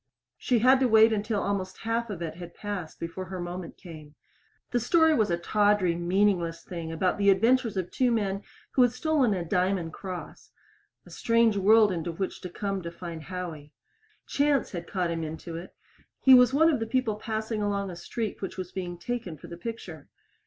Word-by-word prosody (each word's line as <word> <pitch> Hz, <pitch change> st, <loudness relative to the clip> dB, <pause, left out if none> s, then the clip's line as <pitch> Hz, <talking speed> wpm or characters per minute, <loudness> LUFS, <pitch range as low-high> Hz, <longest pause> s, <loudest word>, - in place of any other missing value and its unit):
She 250 Hz, -, +1 dB
had 255 Hz, +4 st, +5 dB
to 260 Hz, -, +3 dB
wait 220 Hz, 0 st, +6 dB
until 210 Hz, 0 st, -1 dB
almost 190 Hz, -2 st, -2 dB
half 230 Hz, +1 st, -1 dB
of 180 Hz, -5 st, -5 dB
it 160 Hz, -2 st, -4 dB
had 175 Hz, 0 st, -10 dB
passed 200 Hz, -6 st, -6 dB
before 165 Hz, +3 st, -5 dB
her 185 Hz, 0 st, -6 dB
moment 175 Hz, 0 st, -6 dB
came. 155 Hz, -4 st, -12 dB, 0.6 s
The 245 Hz, -, +2 dB
story 320 Hz, +6 st, +4 dB
was 220 Hz, -7 st, +2 dB
a 170 Hz, -, +1 dB
tawdry, 205 Hz, 0 st, +2 dB
meaningless 175 Hz, -1 st, +1 dB
thing 170 Hz, -3 st, -6 dB
about 180 Hz, +4 st, 0 dB
the 200 Hz, 0 st, +4 dB
adventures 225 Hz, +2 st, +3 dB
of 180 Hz, -1 st, -3 dB
two 255 Hz, -1 st, +2 dB
men 200 Hz, -4 st, 0 dB, 0.3 s
who 260 Hz, -, +3 dB
had 245 Hz, -1 st, +4 dB
stolen 265 Hz, -5 st, +1 dB
a 175 Hz, -2 st, -3 dB
diamond 180 Hz, -1 st, 0 dB
cross 185 Hz, -2 st, -8 dB, 0.6 s
a -, -, -15 dB
strange 230 Hz, -2 st, +2 dB
world 210 Hz, +2 st, +5 dB
into 170 Hz, -1 st, -3 dB
which 190 Hz, +3 st, -4 dB
to 180 Hz, -, -6 dB
come 195 Hz, +1 st, -3 dB
to 170 Hz, -, -5 dB
find 170 Hz, -1 st, -7 dB
Howie. 165 Hz, -5 st, -7 dB, 0.5 s
Chance 285 Hz, -2 st, +1 dB
had 170 Hz, -2 st, -6 dB
caught 180 Hz, -3 st, -1 dB
him 165 Hz, -1 st, -2 dB
into 160 Hz, +2 st, -6 dB
it 170 Hz, +3 st, -9 dB, 0.4 s
he 265 Hz, -, +7 dB
was 250 Hz, 0 st, +7 dB
one 320 Hz, +4 st, +4 dB
of 280 Hz, -, 0 dB
the 225 Hz, -, -3 dB
people 230 Hz, -3 st, 0 dB
passing 220 Hz, 0 st, -3 dB
along 200 Hz, -2 st, -1 dB
a -, -, -8 dB
street 210 Hz, +5 st, -5 dB
which 195 Hz, -, -5 dB
was 185 Hz, -1 st, -5 dB
being 175 Hz, -2 st, -5 dB
taken 210 Hz, -4 st, -4 dB
for 145 Hz, -, -13 dB
the 170 Hz, 0 st, -8 dB
picture. 175 Hz, -6 st, -8 dB
195 Hz, 195 wpm, -27 LUFS, 175-225 Hz, 0.6 s, he